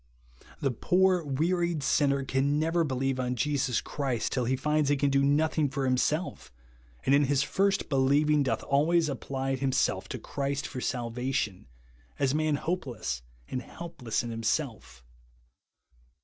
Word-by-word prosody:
The 135 - +1
poor 180 +7 +2
wearied 165 +2 0
sinner 140 -1 +2
can 135 +2 +1
never 165 +2 +2
believe 135 -2 -1
on 125 0 -1
Jesus 130 -2 0
Christ 130 -6 -2
till 125 -2 0
he 130 +3 +1
finds 150 +1 +1
he 145 - +4
can 140 0 +1
do 140 0 +3
no 145 +3 +3
thing 155 -2 0
for 135 0 -2
himself, 150 +7 0 0.5
and 135 - +4
in 145 +1 +5
his 140 0 +2
first 195 +5 +1
believing 145 +2 +3
doth 135 - 0
always 155 +3 +2
apply 135 0 -2
himself 130 0 0
to - - -4
Christ 140 0 -3
for 125 - -5
salvation, 120 - -2 0.5
as 135 -2 +2
a - - +1
man 155 -1 +1
hopeless 130 - -3 0.3
and 130 - -3
helpless 130 -8 -4
in 120 - -5
himself. 110 - -3
140 Hz, 150 wpm, -29 LUFS, 130-150 Hz, 0.5 s, in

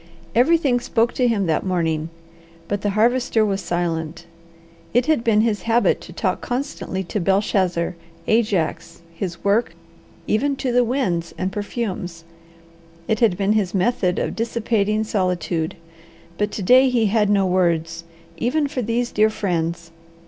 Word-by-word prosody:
Everything 265 +1 +3
spoke 235 -1 0
to 250 - +2
him 215 -5 +1
that 160 -2 0
morning, 165 -4 -1 0.6
but 205 -1 -2
the 205 - 0
Harvester 235 -1 +3
was 195 -1 -1
silent. 165 -2 -3 0.7
It 245 0 +4
had 310 -6 +2
been 220 -3 +3
his 220 -2 0
habit 230 -4 +3
to - - -11
talk 185 +1 -2
constantly 245 -7 -3
to 200 +3 -3
Belshazzar, 185 -2 +1 0.3
Ajax, 175 -6 0
his 170 -1 -5
work, 205 +4 +1 0.5
even 275 +6 +1
the 250 -2 +1
winds 225 -10 -1
and 185 +1 -2
perfumes; 190 -5 -4 0.8
it 220 - 0
had 215 -7 +3
been 200 +1 +2
his 200 -3 0
method 190 -2 +1
of - - -2
dissipating 220 -2 0
solitude, 180 -6 -1 0.6
but 210 +3 0
to 205 - -5
day 255 +6 +6
he 240 -3 +2
had 210 0 +2
no 200 -2 +3
words, 170 -2 0 0.3
even 285 - 0
for 275 -3 -3
these 235 +2 -1
dear 215 +1 +3
friends. 170 -5 -2
205 Hz, 145 wpm, -21 LUFS, 175-235 Hz, 0.8 s, day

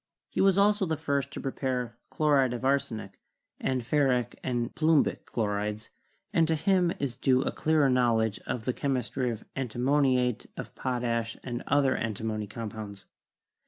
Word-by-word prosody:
He - - -1
was 195 -1 +4
also 205 -1 +3
the 160 -1 -1
first 140 -3 -1
to 140 - -7
prepare 125 -3 -2 0.2
chlo 150 -1 +2
ride 130 -3 +4
of 125 - -5
arsenic, 110 -8 -1 0.4
and 130 -2 -1
ferric 125 -3 +1
and 120 -2 -1
plumbic 160 -1 +2
chlorides, 105 0 -2 0.4
and 165 -4 +4
to 160 - +2
him 175 +2 +2
is 135 -4 -3
due 130 0 +2
a - - -1
clearer 155 -2 +2
knowledge 115 -4 +2
of 115 -3 -3
the 125 - 0
chemistry 130 -2 -1
of 115 -2 -5
anti 130 -4 -4
moniate 130 -2 +2
of - - -7
potash 120 -3 -2
and 120 -1 -4
other 140 -2 +3
antimony 110 -1 -3
compounds. 105 -2 -7
125 Hz, 160 wpm, -28 LUFS, 115-145 Hz, 0.4 s, was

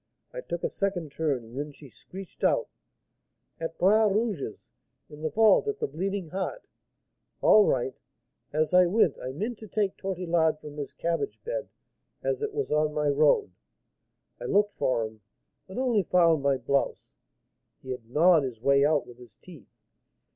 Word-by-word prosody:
I - - -5
took 175 - -5
a - - +1
second 180 -6 -2
turn, 140 -5 -1
and 115 +2 -14
then 150 +1 -4
she 140 - -14
screeched 190 +8 -12
out, - - +2 0.9
'At 165 0 -5
Bras 210 +3 +4
Rouge's, 205 - -2 0.4
in 150 0 -11
the 155 - -1
vault 220 - +4
at 425 0 -1
the 450 - -1
Bleeding 195 - -3
Heart!' 190 - -4 0.8
All 210 -1 +6
right! 130 0 0 0.6
As 155 +3 0
I 180 0 +6
went, 185 -5 +2
I 130 - -4
meant 210 - -4
to 220 - -10
take 205 -1 -1
Tortillard 170 -4 0
from 150 -1 -10
his 145 -2 -5
cabbage 170 - -2
bed, - - -4 0.5
as - - -1
it 435 -1 -2
was 430 +1 -3
on 150 0 +1
my 150 -1 +1
road. 145 -8 +3 0.9
I 120 - -7
looked 205 +8 +2
for 115 -3 0
him, 110 0 -11 0.5
but 190 - -9
only 250 -5 +2
found 170 -4 +3
my 140 -1 +2
blouse, 135 +2 -1 0.7
he 130 - -6
had 120 -3 -7
gnawed 160 +4 +5
his 125 -5 -5
way 140 +3 +3
out 150 0 +2
with 120 0 -14
his 120 -5 -15
teeth. 175 -6 -15
165 Hz, 170 wpm, -27 LUFS, 140-200 Hz, 0.9 s, All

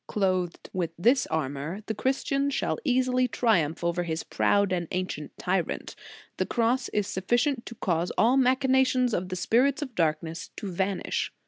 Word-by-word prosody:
Clothed 185 -4 -1
with 175 -3 -1
this 245 +8 +3
armor, 155 +6 -3
the 220 - -2
Christian 275 +4 0
shall 280 - -1
easily 255 -2 +2
triumph 175 -11 +1
over 170 +1 0
his 165 -2 -3
proud 200 -2 +2
and 175 -2 -1
ancient 180 -5 -4
tyrant 180 -1 -2 0.4
The - - 0
Cross 240 +2 +1
is 210 -1 0
sufficient 240 +8 0
to 235 - -8
cause 175 -4 -1
all 240 +4 +4
the 270 - +5
machinations 260 -1 +3
of 180 -1 -1
the 185 - -3
spirits 255 - +2
of 260 -4 -8
darkness 165 -2 -1
to 200 - -5
vanish." 190 +2 -1
200 Hz, 160 wpm, -27 LUFS, 175-255 Hz, 0.4 s, the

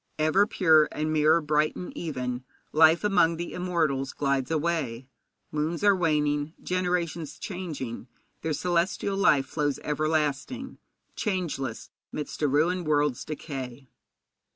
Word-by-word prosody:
'Ever 155 +7 +3
pure, 160 -8 +4
and 155 +1 -2
mirror 155 +2 +4
bright 150 0 +1
and 180 - -7
even, 125 -6 -3 0.3
Life 160 +3 +5
among 180 -5 +3
the 175 +1 -5
immortals 160 -7 0
glides 140 -2 0
away; 155 -7 -1 0.4
Moons 155 +4 -2
are 205 -1 +6
waning, 150 -3 0
generations 175 -4 -1
changing, 150 - -5 0.3
Their 160 - -1
celestial 180 +4 0
life 150 -9 +4
flows 145 +1 -1
everlasting, 155 - -1 0.4
Changeless 170 - -3 0.2
'midst 150 - -5
a 150 - +3
ruined 165 +5 +1
world's 145 -4 +1
decay.' 135 -4 -7
155 Hz, 120 wpm, -27 LUFS, 145-175 Hz, 0.4 s, are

